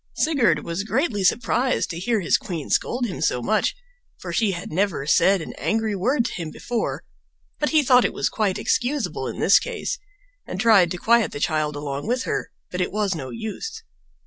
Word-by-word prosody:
Sigurd 235 - +2
was 170 +3 -2
greatly 220 - 0
surprised 245 +6 +1
to 170 - -5
hear 220 +3 0
his 170 - +2
queen 170 -7 -4
scold 245 +1 +1
him 195 - -5
so 125 - +1
much, 215 - +1 0.4
for - - -7
she 220 -3 +2
had 175 0 -6
never 185 -4 0
said 190 +5 +4
an - - -7
angry 220 -1 0
word 235 +6 +1
to - - -3
him 165 -3 -5
before; 235 +8 -3 0.6
but 295 - +1
he 310 -2 +4
thought 250 -1 +5
it - - +1
was - - -1
quite 205 -4 0
excusable 260 +3 -1
in - - -5
this - - +6
case, - - -4 0.5
and - - -5
tried 210 -7 +5
to 180 - -4
quiet 235 +4 +3
the - - -6
child 155 -1 0
along 145 +2 -4
with 250 +2 0
her - - -2 0.2
but 180 - -2
it 180 - -1
was 205 -2 0
no 135 -6 -5
use. 340 - -6
205 Hz, 200 wpm, -23 LUFS, 170-245 Hz, 0.6 s, this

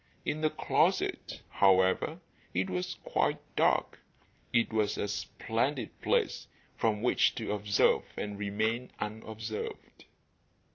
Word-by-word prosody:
In 155 - -1
the 155 - +3
closet, - - 0
however, 95 - +3 0.3
it 95 +1 0
was 90 0 -2
quite - - +1 0.2
dark. - - +2 0.5
It 115 -1 +2
was 105 -2 +1
a - - -1
splendid 100 - -2
place - - +1 0.3
from 110 -1 0
which 125 - +3
to 110 -3 -3
observe 105 -1 +2
and 105 -1 -4
remain 110 +4 -1
unobserved. 110 0 -6
105 Hz, 110 wpm, -31 LUFS, 100-110 Hz, 0.5 s, the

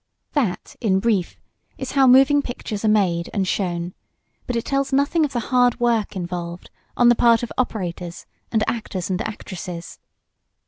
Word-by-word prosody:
That, 240 - -1
in 190 -4 +2
brief, 200 -5 0 0.4
is - - -5
how 270 -2 +4
moving 270 +3 +6
pictures 235 -5 -5
are - - +2
made 185 -5 +2
and 195 -2 +1
shown, 175 -2 -2 0.5
but 245 - -2
it 230 - -1
tells 275 0 0
nothing 285 +4 +2
of 285 - -4
the 245 - -1
hard 245 -1 +4
work 230 -4 +1
involved, 175 -1 -5 0.3
on 240 - +5
the - - +7
part 230 0 +4
of 240 - -4
operators, 180 -8 -3 0.3
and 220 -2 +2
actors 195 -5 -3
and 185 +3 -1
actresses. 180 -5 -7
215 Hz, 165 wpm, -22 LUFS, 180-245 Hz, 0.5 s, the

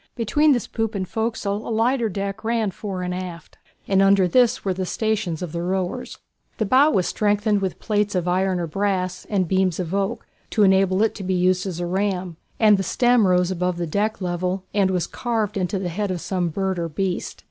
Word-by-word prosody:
Between 290 +7 +3
this 245 -5 +1
poop 225 -1 -3
and 190 -2 -2
forecastle 220 -2 -2
a - - -4
lighter 230 +1 +1
deck 195 +1 -4
ran 225 -2 0
fore 190 -1 -5
and 180 0 -2
aft, 180 -3 -7 0.3
and 195 -1 +3
under 195 -1 +5
this 245 +4 +3
were 190 - +1
the 185 +1 -3
stations 210 -7 -1
of 175 - -5
the 170 +1 -3
rowers. 185 0 -3 0.4
The 220 - 0
bow 265 +8 +5
was 190 - +1
strengthened 205 0 +1
with 190 -2 -2
plates 205 -2 -1
of 180 -1 0
iron 185 +1 +1
or 175 - -1
brass, 185 +1 -2
and 190 -4 +1
beams 185 -1 +1
of 175 -1 -3
oak, 200 +4 -1 0.2
to 215 - +2
enable 190 0 +4
it 220 - +1
to 195 - -7
be 185 0 0
used 180 +1 +2
as 175 -3 -4
a 175 - -2
ram, 185 -2 -2 0.2
and 215 -2 +6
the - - -1
stem 240 +1 +3
rose 180 0 +2
above 180 -1 -1
the 175 - -2
deck 205 +6 -1
level 180 +1 -2
and 200 -2 +3
was 180 -2 0
carved 225 -4 -2
into 190 0 -1
the 185 -2 -3
head 205 +4 -2
of 185 -2 -2
some 180 -1 -1
bird 190 +2 -2
or 170 -1 -2
beast. 185 +3 -3
190 Hz, 215 wpm, -23 LUFS, 180-210 Hz, 0.4 s, and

